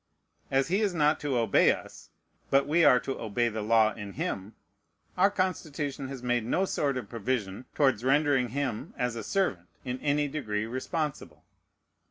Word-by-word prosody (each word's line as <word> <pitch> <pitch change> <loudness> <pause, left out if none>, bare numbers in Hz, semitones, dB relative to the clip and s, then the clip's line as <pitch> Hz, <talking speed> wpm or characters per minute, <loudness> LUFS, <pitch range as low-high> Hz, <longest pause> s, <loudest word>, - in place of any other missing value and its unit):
As 135 +3 +1
he 195 +4 +2
is 200 -4 0
not 150 -1 +3
to 140 -4 -1
obey 115 -4 +4
us, - - -8 0.4
but 135 0 +4
we 165 +3 +3
are 125 - +7
to 135 - -4
obey 115 +2 0
the 110 -1 -4
law 110 0 +3
in 100 -2 -8
him, 100 +4 -4 0.6
our 190 +2 +4
Constitution 155 -8 -2
has 130 -2 -8
made 120 -2 +1
no 175 +12 +1
sort 140 -7 -1
of 125 - -5
provision 115 -2 -3
towards 130 -6 +2
rendering 135 -2 +3
him, 130 -3 -3
as 125 -2 -1
a 115 - -5
servant, 100 - -1 0.2
in 125 0 -3
any 145 0 +1
degree 110 -8 -3
responsible. 130 - -4
130 Hz, 170 wpm, -28 LUFS, 115-150 Hz, 0.6 s, are